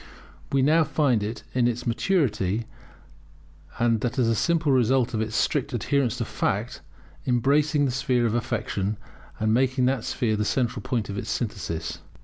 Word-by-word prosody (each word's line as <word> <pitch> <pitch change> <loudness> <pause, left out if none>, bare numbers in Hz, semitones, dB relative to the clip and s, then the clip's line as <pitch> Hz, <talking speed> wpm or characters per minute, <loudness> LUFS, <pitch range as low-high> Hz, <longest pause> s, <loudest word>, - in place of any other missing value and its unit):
We 135 -1 +3
now 160 +4 +5
find 140 -6 +1
it, 110 +2 -4
in 125 -1 +3
its 120 0 -2
maturity, 115 - 0 1.1
and 115 -2 +2
that 125 +2 -2
as 125 -3 +3
a 115 - +3
simple 160 +5 +1
result 130 -1 +2
of 110 - 0
its 110 0 -3
strict 140 -4 0
adherence 125 +1 0
to - - -2
fact, - - -2 0.5
embracing 145 +4 +2
the 130 - 0
sphere 130 -2 +1
of 110 - +1
affection, 110 -4 -2 0.4
and 110 0 +2
making 130 +1 +2
that 130 -2 +1
sphere 115 -5 0
the 105 - 0
central 120 +1 0
point 125 -4 -2
of 100 - -4
its 110 - -6
synthesis. 90 -8 -3
120 Hz, 165 wpm, -25 LUFS, 110-135 Hz, 1.1 s, now